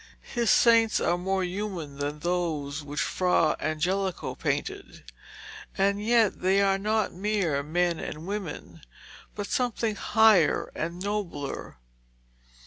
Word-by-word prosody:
His 235 Hz, -2 st, +1 dB
saints 230 Hz, -2 st, +5 dB
are 175 Hz, -, +1 dB
more 190 Hz, +2 st, -1 dB
human 180 Hz, -6 st, -5 dB
than 145 Hz, +1 st, -3 dB
those 155 Hz, -4 st, -2 dB
which 145 Hz, 0 st, -4 dB
Fra 180 Hz, -4 st, +2 dB
Angelico 180 Hz, +4 st, -1 dB
painted, -, -, -4 dB, 0.7 s
and 200 Hz, +1 st, +1 dB
yet 225 Hz, -2 st, +3 dB
they 190 Hz, +2 st, +3 dB
are 195 Hz, -1 st, +2 dB
not 215 Hz, +2 st, 0 dB
mere 185 Hz, -7 st, 0 dB
men 170 Hz, +3 st, 0 dB
and 155 Hz, +2 st, -6 dB
women, 200 Hz, -3 st, -6 dB, 0.5 s
but 205 Hz, -, -4 dB
something 235 Hz, -1 st, -1 dB
higher 220 Hz, -7 st, +3 dB
and 170 Hz, +2 st, -4 dB
nobler. 190 Hz, -, -4 dB
185 Hz, 120 wpm, -27 LUFS, 160-210 Hz, 0.7 s, saints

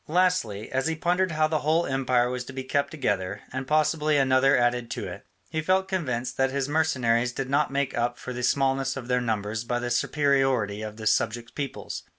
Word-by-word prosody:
Lastly, 160 Hz, -, +1 dB
as 130 Hz, +2 st, 0 dB
he 160 Hz, -, 0 dB
pondered 180 Hz, +3 st, +1 dB
how 155 Hz, 0 st, +3 dB
the 155 Hz, -1 st, 0 dB
whole 160 Hz, +3 st, +2 dB
empire 130 Hz, -2 st, +1 dB
was 125 Hz, 0 st, -3 dB
to 130 Hz, -, -9 dB
be 130 Hz, 0 st, -4 dB
kept 140 Hz, +2 st, 0 dB
together, 100 Hz, -, -2 dB
and 130 Hz, 0 st, -4 dB
possibly 155 Hz, 0 st, +2 dB
another 135 Hz, 0 st, +4 dB
added 120 Hz, -1 st, +1 dB
to -, -, -4 dB
it, -, -, -9 dB, 0.2 s
he 160 Hz, -, -1 dB
felt 190 Hz, +3 st, +2 dB
convinced 130 Hz, -10 st, -2 dB
that 135 Hz, 0 st, +2 dB
his 135 Hz, 0 st, -1 dB
mercenaries 125 Hz, -6 st, +1 dB
did 135 Hz, 0 st, -4 dB
not 145 Hz, +2 st, +2 dB
make 140 Hz, 0 st, -1 dB
up 120 Hz, +1 st, 0 dB
for 125 Hz, -, -6 dB
the 125 Hz, -, -4 dB
smallness 135 Hz, +1 st, +1 dB
of 125 Hz, -3 st, -6 dB
their 125 Hz, 0 st, +1 dB
numbers 110 Hz, -1 st, -2 dB
by 120 Hz, +1 st, -1 dB
their 120 Hz, 0 st, -3 dB
superiority 135 Hz, -9 st, +1 dB
to 110 Hz, -, -4 dB
the 110 Hz, +1 st, -9 dB
subject 115 Hz, +2 st, 0 dB
peoples. 140 Hz, -2 st, -5 dB
130 Hz, 205 wpm, -26 LUFS, 120-150 Hz, 0.2 s, another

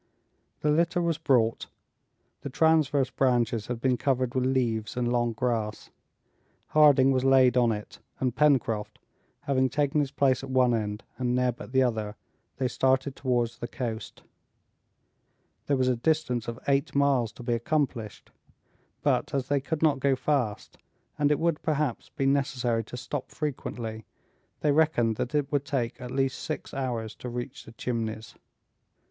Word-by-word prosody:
The 150 Hz, -, +2 dB
litter 170 Hz, +3 st, +2 dB
was 170 Hz, -3 st, 0 dB
brought; 115 Hz, -4 st, +2 dB, 0.7 s
the 140 Hz, -, -5 dB
transverse 150 Hz, -2 st, +2 dB
branches 120 Hz, -4 st, +1 dB
had 125 Hz, -2 st, -3 dB
been 125 Hz, 0 st, +1 dB
covered 130 Hz, -2 st, 0 dB
with 130 Hz, -1 st, +1 dB
leaves 120 Hz, -4 st, -1 dB
and 120 Hz, 0 st, 0 dB
long 120 Hz, -1 st, +1 dB
grass. 110 Hz, -2 st, -2 dB, 0.8 s
Harding 145 Hz, -3 st, +6 dB
was 130 Hz, -1 st, +1 dB
laid 130 Hz, -1 st, +5 dB
on 120 Hz, -2 st, +4 dB
it, 105 Hz, -1 st, -6 dB, 0.2 s
and 130 Hz, -2 st, -1 dB
Pencroft, 130 Hz, -8 st, +2 dB, 0.4 s
having 130 Hz, -1 st, +1 dB
taken 145 Hz, +1 st, +1 dB
his 145 Hz, -2 st, 0 dB
place 135 Hz, -2 st, +1 dB
at 135 Hz, -, -7 dB
one 130 Hz, -2 st, +3 dB
end 105 Hz, -2 st, -2 dB, 0.2 s
and 125 Hz, -1 st, 0 dB
Neb 125 Hz, -1 st, 0 dB
at -, -, -9 dB
the 130 Hz, 0 st, +4 dB
other, 110 Hz, -4 st, -2 dB, 0.4 s
they 130 Hz, -, 0 dB
started 130 Hz, +2 st, +1 dB
towards 120 Hz, -3 st, -1 dB
the 120 Hz, -, -4 dB
coast. 115 Hz, -2 st, -5 dB, 1.4 s
There 140 Hz, -, +2 dB
was 130 Hz, -1 st, +1 dB
a 130 Hz, -, +3 dB
distance 125 Hz, -4 st, 0 dB
of 115 Hz, 0 st, -4 dB
eight 140 Hz, +1 st, +1 dB
miles 135 Hz, -5 st, +2 dB
to 120 Hz, -, -11 dB
be 120 Hz, 0 st, 0 dB
accomplished; 120 Hz, -3 st, -2 dB, 0.7 s
but, -, -, +1 dB
as 135 Hz, -1 st, -2 dB
they 140 Hz, -1 st, +2 dB
could 155 Hz, +3 st, -3 dB
not 145 Hz, -4 st, +3 dB
go 135 Hz, 0 st, +2 dB
fast, 130 Hz, -7 st, -2 dB, 0.4 s
and 145 Hz, -1 st, +3 dB
it 150 Hz, -, +3 dB
would 165 Hz, -2 st, 0 dB
perhaps 150 Hz, -5 st, -1 dB
be 135 Hz, -, -3 dB
necessary 135 Hz, -4 st, +1 dB
to 125 Hz, -, -8 dB
stop 130 Hz, +2 st, -5 dB
frequently, 115 Hz, -7 st, -5 dB, 0.6 s
they 150 Hz, -, +3 dB
reckoned 140 Hz, -8 st, +2 dB
that 130 Hz, +5 st, -3 dB
it 145 Hz, -2 st, 0 dB
would 145 Hz, -2 st, +1 dB
take 130 Hz, -4 st, -2 dB
at 125 Hz, -, -6 dB
least 135 Hz, +1 st, -1 dB
six -, -, -5 dB
hours 120 Hz, -5 st, -3 dB
to 125 Hz, -, -6 dB
reach 120 Hz, +3 st, -6 dB
the -, -, -11 dB
Chimneys. 115 Hz, -1 st, -4 dB
130 Hz, 165 wpm, -27 LUFS, 120-140 Hz, 1.4 s, Harding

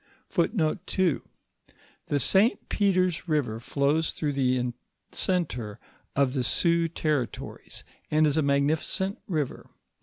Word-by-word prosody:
f -, -, +3 dB, 1.6 s
The 145 Hz, -, +1 dB
Si 200 Hz, -, +5 dB
Peter's 185 Hz, -4 st, +1 dB
river 135 Hz, -8 st, 0 dB
flows 145 Hz, +6 st, +1 dB
through 150 Hz, -2 st, -2 dB
the 125 Hz, -2 st, +1 dB, 0.4 s
centre 125 Hz, -, -1 dB, 0.4 s
of 135 Hz, -2 st, +2 dB
the 130 Hz, -3 st, 0 dB
Sioux 170 Hz, +5 st, +3 dB
territories, 150 Hz, -6 st, -3 dB, 0.3 s
and 155 Hz, +1 st, +4 dB
is 145 Hz, -2 st, +2 dB
a 160 Hz, -, +3 dB
magnificent 150 Hz, +7 st, +1 dB
river. 155 Hz, -7 st, -3 dB
150 Hz, 110 wpm, -27 LUFS, 135-170 Hz, 1.6 s, Si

